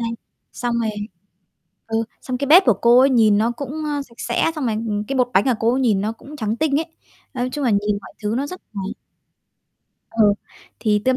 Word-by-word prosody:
này. 230 -1 -2 0.4
Xong 240 -1 -2
rồi 220 -1 0 1.0
ừ, 225 0 0 0.2
xong 250 -1 -3
cái 280 - -1
bếp 345 +7 +8
của 240 - +7
cô 240 +1 +7
ấy 270 +1 +5
nhìn 220 -5 +4
nó 225 +2 +2
cũng, 285 +5 -5
a, 290 -1 -1
sạch 235 -4 -19
sẽ, 240 +7 +1
xong 290 -5 -2
rồi, 225 - 0
ừm, 215 -1 -2
cái 275 +4 -3
bột 250 -1 +2
bánh 190 - +5
của 260 - +3
cô 230 +2 +3
ấy 265 - +1
nhìn 220 -7 +2
nó 215 +2 -1
cũng 285 +6 -12
trắng 220 -3 -2
tinh 295 +1 +1
ấy. 325 - -4 0.5
Nói 250 0 -2
chung 295 -2 -2
là 245 - +3
nhìn 205 0 +1
mọi - - -12
thứ 210 +2 -1
nó 275 - -1
rất 365 +5 -8
là 200 - -3 1.3
ờ, 225 -1 +3 0.5
thì 210 -2 +1
tươm 260 0 +3
240 Hz, 230 wpm, -21 LUFS, 220-275 Hz, 1.3 s, bếp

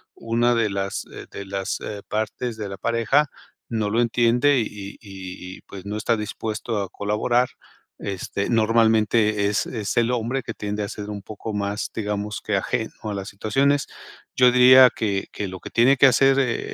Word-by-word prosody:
una 120 +1 +1
de 115 -3 +1
las, 100 0 -3
eh, - - -9
de 100 - -8
las, 95 0 -3
eh, 105 -1 -6
partes 110 +2 -3
de 105 -2 -4
la 95 - -7
pareja 115 +8 +2 0.4
no 110 -3 -1
lo 115 +2 +2
entiende 120 +4 +3
y 115 - 0
y 100 -1 -8
y 95 -2 -9
y - - -17
pues 95 -1 -10
no 105 +1 -4
está 115 +1 +1
dispuesto 105 0 -3
a 95 - -4
colaborar, 120 +4 0 0.5
este, 100 +1 -4
normalmente 110 -2 +3
es 100 0 0
es 105 -5 -3
el 120 +1 +3
hombre 125 +2 -1
que 115 - -5
tiende 105 0 -4
a 100 - -4
ser 105 0 -7
un 105 -1 -5
poco 110 +2 -7
más, 100 0 -2
digamos 105 -1 -3
que 105 -2 +1
ajeno 110 +3 -2
a 105 -1 -3
las 100 0 -5
situaciones. 135 +8 +1 0.5
Yo 125 -1 +6
diría 125 +1 +8
que 100 -3 -2
que 100 - -4
lo 95 -1 -8
que - - -8
tiene 125 +4 +4
que 140 - +6
hacer 135 +2 +4
el 125 -4 +1
110 Hz, 190 wpm, -23 LUFS, 100-120 Hz, 0.5 s, diría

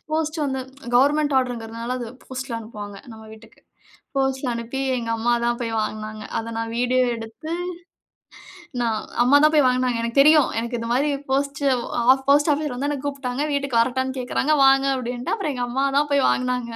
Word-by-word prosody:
Post 315 0 -1
வந்த 265 -1 -2 0.4
government 290 +2 +3
ஆர்டர்ங்கிறதுனால 235 -1 -3
அது 240 - -5 0.2
போஸ்ட்ல 260 0 -6
அனுப்புவாங்க. 210 -3 -8 0.2
நம்ம 220 - -12
வீட்டுக்கு 220 0 -16 0.6
போஸ்ட்ல 265 -1 0
அனுப்பி 235 +3 -5 0.2
எங்க 230 -1 -4
அம்மா 230 +2 0
தான் 240 0 +1
போய் 230 -2 -3
வாங்குனாங்க. 215 0 -4
அத 230 0 -4
நான் 225 0 -3
வீடியோ 250 +1 +2
எடுத்து 225 +8 -8 1.3
நான் 225 -2 0 0.2
அம்மா 255 +4 +5
தான் 305 - +5
போய் 295 -2 +5
வாங்குனாங்க. 250 -1 +1
எனக்குத் 235 +4 +2
தெரியும். 305 0 +6
எனக்கு 235 +1 -2
இந்தமாரி 240 +5 0 0.2
போஸ்ட் 280 +1 0 0.7
போஸ்ட் 290 +2 +5
ஆபீஸ்ல 290 -3 -2
வந்து 280 +3 -2
என்ன 290 - -2
கூப்டாங்க. 275 -1 -3
வீட்டுக்கு 275 -4 0
வரட்டான்னு 260 +2 0
கேக்குறாங்க. 255 +4 0
வாங்க 270 0 +5
அப்டின்னே. 245 -1 -4
அப்புறம் 350 -10 -2
எங்க 245 -1 -2
அம்மா 265 +3 0
தான் 295 +1 +3
போய் 280 -1 +3
வாங்குனாங்க. 250 -2 0
255 Hz, 165 wpm, -23 LUFS, 235-280 Hz, 1.3 s, தெரியும்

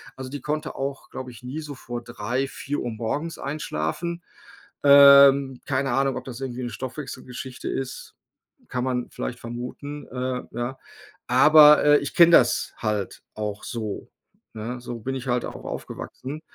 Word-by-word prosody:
Also 130 -1 -8
die 145 -1 -6
konnte 150 +2 -3
auch, 135 0 -5
glaube 130 -1 -6
ich, 120 +1 -14
nie 130 +5 -5
so 150 -2 -8
vor 120 -2 -7
3, 120 +3 -2
4 140 -2 -4
morgens 145 +9 -3
einschlafen. 155 - -3 0.6
Ähm, 140 -2 +8
keine 135 -1 0
Ahnung, 135 +1 +1
ob - - -6
das 130 0 -8
irgendwie 130 -1 -4
'ne 120 - -4
Stoffwechselgeschichte 130 -1 -7
ist, 130 -1 -5 0.5
kann 125 -1 -2
man 125 -1 -2
vielleicht 125 - -5
vermuten. 125 +5 -7
Äh, 125 0 -3
ja, 120 +3 -4 0.5
aber, 150 +4 +7
äh, 145 0 +7
ich 145 - -6
kenne 170 -1 +7
das 125 -6 +4
halt 105 -3 -3
auch 105 -1 -4
so, 110 -4 -5 0.4
ne, 115 +3 -5
so 120 -1 -6
bin 130 +4 -4
ich 130 0 -6
halt 125 -1 0
auch - - -8
aufgewachsen. 145 +4 -7
130 Hz, 155 wpm, -24 LUFS, 120-140 Hz, 0.6 s, Ähm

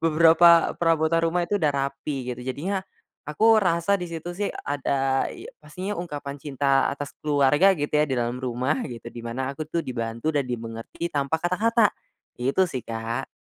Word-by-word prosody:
Beberapa 165 +1 +5
perabotan 165 0 +2
rumah 175 +1 0
itu 205 +4 0
udah 150 -4 +2
rapi 135 -1 -3
gitu 125 - -5
jadinya 175 +10 -2 0.5
aku 220 +9 +4
rasa 180 +1 +2
di 180 - -4
situ 170 +1 -6
sih 205 - 0
ada 135 -1 0
iy - - -10
pastinya 180 +6 -6
ungkapan 145 -4 -6
cinta 135 -1 +1
atas 145 0 -4
keluarga 145 +6 +4
gitu 145 -2 -3
ya 150 0 +3
di 135 - -1
dalam 120 0 -1
rumah, 130 +3 -1
gitu 120 -3 -8
di 120 - -10
mana 130 +3 -3
aku 150 +2 -6
tuh 165 +1 -2
dibantu 115 +3 -3
dan 145 -4 0
dimengerti 115 +7 -5
tanpa 145 +2 -1
kata-kata, 215 +5 +3 0.5
itu 135 +9 +2
sih 130 - -5
Kak. 115 +3 -3
145 Hz, 170 wpm, -25 LUFS, 130-170 Hz, 0.5 s, Beberapa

